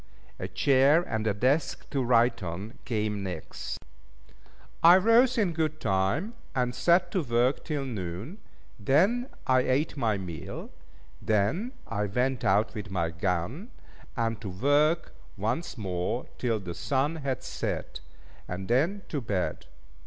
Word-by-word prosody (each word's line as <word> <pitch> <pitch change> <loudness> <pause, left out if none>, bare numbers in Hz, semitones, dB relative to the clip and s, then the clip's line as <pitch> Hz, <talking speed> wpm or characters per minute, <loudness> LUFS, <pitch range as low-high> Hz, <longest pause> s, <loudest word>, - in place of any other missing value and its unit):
A 95 - -3
chair, 135 - +4
and 110 -8 -2
a 105 - +2
desk 130 +9 +1
to 140 - 0
write 120 -1 +3
on, 95 +6 -6
came 105 -3 -1
next. 90 -5 -5 1.0
I 170 +2 +9
rose 235 +6 +5
in 200 -7 +2
good 155 -1 -1
time, 95 - 0 0.2
and 125 -1 +1
set 175 +5 +3
to 185 - +1
work 125 0 +1
till 150 -3 -2
noon, 105 - -5 0.4
then 195 - +3 0.2
I 130 0 +4
ate 130 +5 +1
my 110 -6 +1
meal, 85 -5 -7 0.5
then 110 - +1
I 105 -2 -2
went 125 +4 0
out 105 +3 +3
with 105 -2 -6
my 85 -4 -1
gun, 90 - -2 0.5
and 115 -2 -1
to 105 - -5
work 145 - +2 0.2
once 115 - -2
more 95 +2 -2
till 115 -3 0
the 90 -3 -6
sun 135 - 0
had 135 -5 -3
set; - - -4 0.5
and 95 +1 -5
then 165 - +1
to 145 - -2
bed. 100 -6 -2
125 Hz, 140 wpm, -28 LUFS, 100-155 Hz, 1.0 s, I